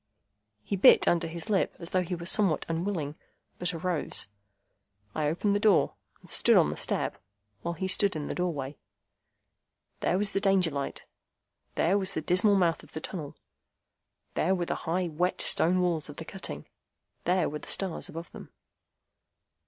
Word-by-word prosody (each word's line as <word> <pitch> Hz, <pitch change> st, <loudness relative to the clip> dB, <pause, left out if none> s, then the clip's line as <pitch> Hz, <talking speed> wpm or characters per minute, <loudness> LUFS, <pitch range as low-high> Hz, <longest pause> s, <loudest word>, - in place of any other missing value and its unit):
He 200 Hz, -, -2 dB
bit 190 Hz, -, +7 dB
his -, -, +5 dB
under 170 Hz, -1 st, 0 dB
lip 170 Hz, +4 st, -1 dB
as 170 Hz, -2 st, -6 dB
though 185 Hz, -, +2 dB
he 180 Hz, 0 st, -3 dB
were 170 Hz, 0 st, -7 dB
somewhat 185 Hz, -4 st, +3 dB
unwilling, 165 Hz, -3 st, -2 dB, 0.5 s
but 180 Hz, +2 st, -1 dB
arose. 170 Hz, -1 st, -2 dB, 0.9 s
I 155 Hz, -1 st, 0 dB
opened 200 Hz, +6 st, +1 dB
the -, -, +2 dB
door, 205 Hz, -3 st, +4 dB, 0.3 s
and -, -, -18 dB
stood -, -, +4 dB
on 75 Hz, -, +4 dB
the -, -, -4 dB
step, -, -, -1 dB, 0.4 s
while 170 Hz, 0 st, -3 dB
he 190 Hz, +3 st, -2 dB
stood 195 Hz, 0 st, +3 dB
in 150 Hz, -2 st, -3 dB
the -, -, -3 dB
doorway. 150 Hz, -6 st, -3 dB, 1.2 s
There 180 Hz, -, +1 dB
was 200 Hz, 0 st, -1 dB
the 195 Hz, -, 0 dB
Danger 195 Hz, -4 st, +3 dB
light. 140 Hz, -1 st, -4 dB, 0.7 s
There 190 Hz, +5 st, +3 dB
was 190 Hz, 0 st, -3 dB
the 160 Hz, -, -1 dB
dismal 185 Hz, +5 st, +4 dB
mouth 175 Hz, -4 st, +2 dB
of -, -, -18 dB
the -, -, -4 dB
tunnel. 155 Hz, -4 st, -6 dB, 1.0 s
There 185 Hz, +4 st, +2 dB
were 175 Hz, -2 st, -1 dB
the -, -, -1 dB, 0.2 s
high, 180 Hz, +2 st, +1 dB
wet 175 Hz, +3 st, -1 dB
stone 180 Hz, +2 st, +3 dB
walls 170 Hz, -4 st, 0 dB
of 145 Hz, -, -8 dB
the 160 Hz, -, -8 dB
cutting. 75 Hz, -, -7 dB, 0.6 s
There 180 Hz, -1 st, +2 dB
were 150 Hz, -, -4 dB
the -, -, -12 dB
stars 190 Hz, -4 st, -1 dB
above 165 Hz, +2 st, -8 dB
them. -, -, -11 dB
175 Hz, 175 wpm, -29 LUFS, 160-190 Hz, 1.2 s, bit